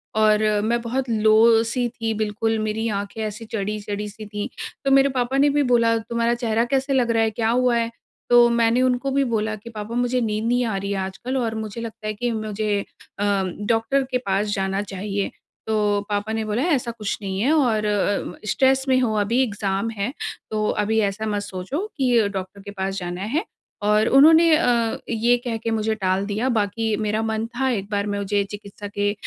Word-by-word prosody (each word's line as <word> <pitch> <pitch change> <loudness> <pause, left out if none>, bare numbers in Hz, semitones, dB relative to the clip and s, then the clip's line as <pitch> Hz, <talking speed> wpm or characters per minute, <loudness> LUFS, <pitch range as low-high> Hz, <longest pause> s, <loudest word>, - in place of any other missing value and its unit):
और 215 0 +4 0.2
मैं 235 +3 0
बहुत 250 +2 -2
लो 225 +1 +5
सी 240 +2 -1
थी 225 -1 -3
बिल्कुल 220 +1 -1
मेरी 215 +1 -1
आँखें 205 +2 -6
ऐसी 215 +1 -5
चढ़ी-चढ़ी 210 -1 -4
सी 215 +1 -10
थी। 205 0 -5 0.4
तो 275 - +2
मेरे 275 0 +5
पापा 255 0 -1
ने 285 +1 +5
भी 290 +1 +2
बोला, 230 -3 +3
"तुम्हारा 235 +1 0
चेहरा 230 -1 0
कैसे 270 +1 +1
लग 245 -3 +2
रहा 225 -1 +3
है, 220 - +2
क्या 220 +1 -1
हुआ 250 +1 +3
है?" 230 0 -1 0.4
तो 240 0 +7
मैंने 235 +1 +3
उनको 255 +1 +1
भी 275 +1 +2
बोला 215 -1 0
कि, 215 +2 -11
"पापा 220 0 -6
मुझे 245 +1 +1
नींद 215 -1 -1
नहीं 245 +1 +2
आ 220 -3 -2
रही 200 +1 -3
है 200 - -1
आजकल 190 +8 -4
और 230 -3 -1
मुझे 220 +1 -5
लगता 220 -2 -7
है 215 - -1
कि 240 +3 -2
मुझे 215 -2 -1 0.4
अ, - - 0 0.4
डॉक्टर 230 +4 +2
के 255 - +2
पास 195 +2 +1
जाना 195 0 -1
चाहिए।" 200 0 -3 0.4
तो 210 -2 +1
पापा 205 +1 -1
ने 220 0 -1
बोला, 215 +4 -1
"ऐसा 275 -8 +1
कुछ 215 -3 -4
नहीं 190 -1 -3
है 250 +8 +2
और 235 -9 +2
उम, 205 -2 0 0.2
स्ट्रेस 265 +2 +3
में 260 -1 +4
हो 230 -3 +1
अभी 230 +5 +2
एग्जाम 200 -2 -2
है, 220 +1 -3 0.4
तो 215 -1 0 0.2
अभी 220 +2 +1
ऐसा 210 +3 -5
मत 205 -1 -1
सोचो 205 - -4
कि 245 -6 +3
डॉक्टर 195 0 -6
के 200 +1 -9
पास 195 0 -2
जाना 175 0 -5
है।" 325 - +2 0.4
और 210 +1 +3
उन्होंने 320 +5 +7
अ, 235 -7 +1
ये 235 +2 +2
कह 230 -2 -1
के 230 +1 -3
मुझे 220 0 0
टाल 190 -1 0
दिया, 215 +5 -1
बाकी 220 -1 0
मेरा 215 +1 0
मन 220 0 -1
था 265 +1 +1
एक 200 -5 -2
बार 205 0 0
मुझे 200 0 0
चिकित्सा 205 0 -8
के 205 0 -1
220 Hz, 205 wpm, -23 LUFS, 205-240 Hz, 0.4 s, तो